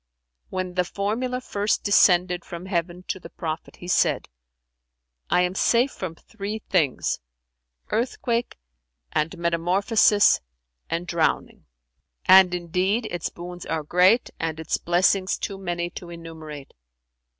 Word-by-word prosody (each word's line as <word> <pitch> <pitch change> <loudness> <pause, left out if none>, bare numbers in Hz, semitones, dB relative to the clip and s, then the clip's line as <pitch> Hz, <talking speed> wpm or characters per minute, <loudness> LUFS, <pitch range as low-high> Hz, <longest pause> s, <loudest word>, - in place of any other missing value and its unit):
When 185 -1 -3
the 180 0 +2
formula 220 +7 -2
first 205 -3 -1
descended 180 -3 +4
from 170 +1 -8
heaven 175 -1 -2
to 190 - -3
the 165 - -11
Prophet, 160 -2 -5
he 175 - -11
said, 180 - +2 1.0
'I 180 - +4
am 180 0 +1
safe 240 +7 +3
from 175 -3 -6
three 210 +3 -6
things, 175 -10 0 0.7
earthquake 235 +1 -1 0.5
and 160 +4 -1
metamorphosis 190 +6 +3 0.5
and 170 +1 -2
drowning; 170 -3 -1 0.6
and 185 -1 +7
indeed 185 +6 0
its 175 -2 -2
boons 175 0 -8
are 160 -1 -2
great 180 +9 +4
and 160 -1 -2
its 160 - -1
blessings 185 +2 +2
too 195 -1 -5
many 175 -2 -3
to 175 - -9
enumerate. 160 -4 -9
180 Hz, 125 wpm, -24 LUFS, 170-200 Hz, 1.0 s, and